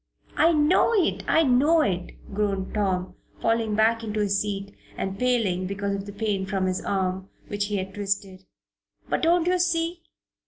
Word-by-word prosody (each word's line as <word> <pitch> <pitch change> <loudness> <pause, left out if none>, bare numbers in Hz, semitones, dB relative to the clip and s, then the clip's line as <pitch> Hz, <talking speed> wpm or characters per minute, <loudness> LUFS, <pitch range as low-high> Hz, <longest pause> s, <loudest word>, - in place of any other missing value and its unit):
"I 325 +3 +5
know 315 +8 +3
it! 380 -6 +1
I 320 - +4
know 290 +5 +4
it!" 180 -7 -2 0.2
groaned 195 -2 -1
Tom, 190 -3 -1 0.3
falling 225 -2 +1
back 225 +1 +2
in 215 -1 -4
his 200 -2 +1
seat 200 -1 -4 0.2
and 195 0 -3
paling 220 -8 +1
because 200 +1 -2
of 195 0 -4
the - - -6
pain 200 -2 -2
from 190 -1 -1
his 185 0 -1
arm, 190 0 -2 0.2
which 205 0 -1
he 210 - -2
had 190 0 -4
twisted. 195 -2 -3 0.6
"But - - -1
don't 335 +1 +3
you 365 +1 +2
see? 340 -1 0
205 Hz, 170 wpm, -25 LUFS, 195-250 Hz, 0.6 s, I